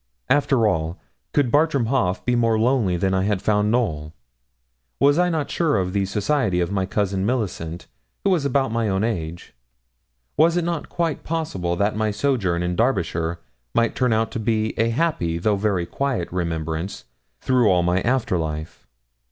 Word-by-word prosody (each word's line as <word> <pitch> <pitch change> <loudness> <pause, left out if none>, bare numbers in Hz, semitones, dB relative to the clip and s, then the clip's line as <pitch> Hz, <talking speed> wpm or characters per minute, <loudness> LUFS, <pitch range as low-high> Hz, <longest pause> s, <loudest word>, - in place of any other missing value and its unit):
After 135 -4 +3
all, 80 -4 0 0.3
could 140 -5 +1
Bartram 145 -4 +3
Haugh 115 -7 +1
be 125 - +2
more 115 -2 +2
lonely 110 -6 +2
than 95 +2 0
I 95 - +2
had 100 -2 0
found 105 +1 +1
Knowl? 80 -10 -1 0.8
Was 145 +3 +4
I 180 0 +3
not 160 -4 -2
sure 160 -6 +1
of 90 -1 -1
the 100 -1 +1
society 105 0 0
of 85 +1 -1
my 95 -2 -1
Cousin 95 -1 -1
Millicent, 90 -8 -2 0.4
who 200 - +2
was 175 -6 +2
about 135 -2 +1
my 115 -2 0
own 95 +1 0
age? 85 -7 -4 0.8
Was 165 +3 +4
it 175 - +1
not 170 -2 -3
quite 165 -3 -2
possible 95 - -2
that 100 +4 0
my 110 0 0
sojourn 105 -7 0
in 90 0 -1
Derbyshire 85 -8 0 0.3
might 115 -1 +2
turn 125 -2 +1
out 110 +3 0
a 110 0 0
happy 115 - 0
though 105 +5 +1
very 100 -3 0
quiet 130 -1 -2
remembrance 85 0 -3 0.3
through 125 -4 +3
all 90 -2 +3
my 90 +2 +1
after 120 -7 0
life? 80 +1 -5
105 Hz, 170 wpm, -22 LUFS, 90-130 Hz, 0.8 s, Was